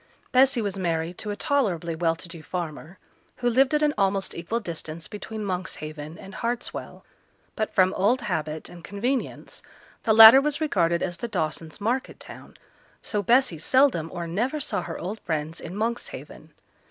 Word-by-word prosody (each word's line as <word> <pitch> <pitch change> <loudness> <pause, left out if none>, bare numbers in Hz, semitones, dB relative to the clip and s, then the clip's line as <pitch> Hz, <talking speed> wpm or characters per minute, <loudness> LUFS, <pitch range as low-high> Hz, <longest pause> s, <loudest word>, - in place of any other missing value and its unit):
Bessy 255 -2 +4
was 200 -1 -3
married 170 -1 -2
to 210 - -4
a 205 - -2
tolerably 205 - 0
well 165 0 +1
to 165 - -8
do 165 -1 -8
farmer 170 +1 -6 0.4
who 245 - -2
lived 265 +4 +4
at 300 - +2
an 295 -1 +3
almost 195 0 +1
equal 170 +8 -3
distance 165 -4 -6
between 210 +1 -6
Monkshaven 155 -4 -5
and 195 - -11
Hartswell; 235 +3 -4 0.5
but 215 -1 -2
from 185 0 +4
old 230 +7 +2
habit 160 -7 -3
and 175 -1 -11
convenience 240 +8 -3 0.4
the 220 - +3
latter 225 +4 +11
was 295 0 -1
regarded 170 - +1
as 175 -1 -3
the 235 - -4
Dawsons' 160 -5 -3
market 240 +5 -2
town; - - -12 0.5
so 210 - -1
Bessy 235 - +3
seldom 245 - +3
or 170 - -4
never 235 - -1
saw 235 -10 -2
her 170 -1 -6
old 205 +5 -5
friends 160 -1 -3
in 170 +3 -7
Monkshaven. 230 +3 -4
195 Hz, 165 wpm, -25 LUFS, 170-235 Hz, 0.5 s, latter